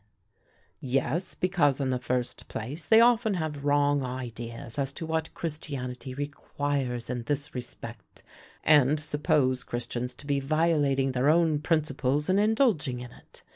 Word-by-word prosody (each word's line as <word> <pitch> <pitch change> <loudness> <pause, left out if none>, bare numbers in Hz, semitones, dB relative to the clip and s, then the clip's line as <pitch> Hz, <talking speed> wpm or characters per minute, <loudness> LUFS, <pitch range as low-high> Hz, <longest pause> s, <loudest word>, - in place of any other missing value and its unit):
"Yes, 135 +7 -1
because, 175 -7 +2
in 135 -2 0
the 125 - 0
first 125 -1 -2
place, 145 +8 -6
they 225 0 +7
often 230 -3 +4
have 155 -4 -3
wrong 145 0 +3
ideas 120 -1 -5
as 135 -1 0
to 165 - -5
what 160 0 -2
Christianity 135 -5 -4
requires 140 -3 -3
in 125 -1 -3
this 145 +2 -2
respect, 120 -4 -8 0.4
and 150 -1 +5
suppose 145 -4 +1
Christians 120 +1 -4
to 145 - -12
be 140 -1 +1
violating 145 -2 +2
their 130 +3 +2
own 160 -2 +3
principles 150 -1 0
in 195 - +3
indulging 210 - +2
in 125 -1 -8
it. - - -17
145 Hz, 140 wpm, -28 LUFS, 125-155 Hz, 0.4 s, they